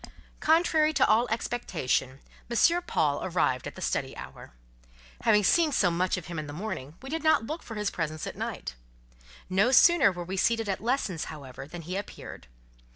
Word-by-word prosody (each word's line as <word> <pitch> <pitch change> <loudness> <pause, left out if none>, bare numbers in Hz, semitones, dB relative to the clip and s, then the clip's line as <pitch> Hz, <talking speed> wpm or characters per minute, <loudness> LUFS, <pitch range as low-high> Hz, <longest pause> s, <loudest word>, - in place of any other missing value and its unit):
Contrary 315 -1 +3
to 270 -3 +4
all 225 +3 +3
expectation, 170 - -2 0.3
M. 335 +9 +3
Paul 145 -2 +1
arrived 150 -8 0
at - - -8
the - - -7
study - - -2
hour. - - -10 0.7
Having 210 -2 +4
seen 320 - +4
so 185 -10 +2
much 180 +2 0
of 180 - -7
him 170 -2 -5
in 155 - -6
the 145 - -7
morning, 155 -5 -5
we 265 - -7
did 325 0 -3
not 315 -8 +3
look 315 +6 -5
for 225 - -9
his 210 -1 -1
presence 155 -2 -3
at - - -6
night. - - -5 0.7
No 195 +5 +3
sooner 270 - +6
were 175 -1 -6
we 190 +2 -4
seated 225 +2 +1
at 195 -2 -2
lessons, 220 - -1
however, 135 -3 -9
than 170 +2 -8
he 180 +4 -5
appeared. 200 - -8
200 Hz, 185 wpm, -28 LUFS, 165-250 Hz, 0.7 s, sooner